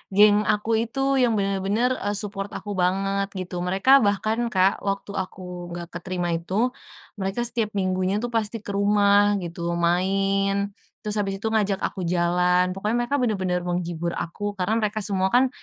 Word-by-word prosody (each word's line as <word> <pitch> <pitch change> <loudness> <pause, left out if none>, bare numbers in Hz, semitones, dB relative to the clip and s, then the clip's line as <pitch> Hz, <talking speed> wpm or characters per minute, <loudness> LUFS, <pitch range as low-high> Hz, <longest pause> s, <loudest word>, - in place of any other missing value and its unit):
Geng 210 +1 +6
aku 210 +1 0 0.2
itu 270 +3 0
yang 240 -2 +3
benar-benar, 200 +4 +1
eee, 205 0 -2
support 200 -1 -2
aku 205 - -6
banget 195 +2 0
gitu. 185 -2 -5
Mereka 195 +8 +2
bahkan, 215 +3 0
Kak, 190 +1 +3
waktu 200 +1 -2
aku 190 0 -5 0.3
enggak 175 0 -6
keterima 180 -2 -3
itu, 190 +9 0 0.5
mereka 195 +4 -2
setiap 230 -2 0
minggunya 185 +1 0
tuh 240 - -2
pasti 225 -1 -1
ke 205 - -6
rumah 205 0 +4
gitu 170 0 -4
main, 195 +3 +1 0.3
terus 210 0 -1
abis 195 -1 -1
itu 225 - -1
ngajak 205 -3 0
aku 185 -3 -3
jalan. 180 +1 +2
Pokoknya 210 +4 -1
mereka 280 +4 0
benar-benar 185 -7 0
menghibur 175 -1 -2
aku 205 +5 -4
karena 205 +4 0
mereka 215 0 -1
semua 190 -2 +1
kan, 255 +1 +5
195 Hz, 160 wpm, -24 LUFS, 185-210 Hz, 0.5 s, Geng